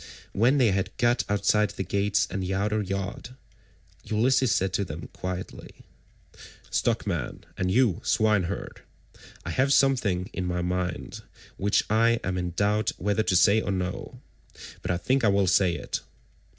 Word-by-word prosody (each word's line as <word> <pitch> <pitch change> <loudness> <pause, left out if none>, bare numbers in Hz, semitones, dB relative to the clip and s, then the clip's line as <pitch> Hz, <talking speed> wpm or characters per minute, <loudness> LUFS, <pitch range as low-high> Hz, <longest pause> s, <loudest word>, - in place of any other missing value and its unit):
When 120 +7 +3
they 120 -6 +4
had 95 0 -2
got 120 0 +2
outside 105 +1 +2
the 95 - -4
gates 100 +2 +1
and 95 - -3
the 95 +1 -2
outer 105 +2 0
yard, 100 +5 -5 0.7
Ulysses 125 +3 +2
said 95 -1 +1
to 100 - +1
them 80 -3 -7
quietly: 90 0 -7 0.9
"Stockman, 100 - -1
and 90 -1 -1
you 115 -3 +2
swineherd, 100 -4 0 0.6
I - - -3
have 135 +2 +1
something 120 -10 +2
in 90 - -3
my 90 0 -1
mind 90 0 -3 0.4
which 100 +1 +2
I 115 +2 +3
am 95 - -2
in 90 0 -2
doubt 105 +1 +1
whether 105 +2 0
to 95 - +1
say 100 +5 +5
or 100 - -2
no; 95 -1 -4 0.6
but - - -5
I 90 - +1
think 130 +8 0
I - - +5
will 100 -1 +3
say 90 -1 +3
it. - - -4
100 Hz, 155 wpm, -26 LUFS, 90-110 Hz, 0.9 s, say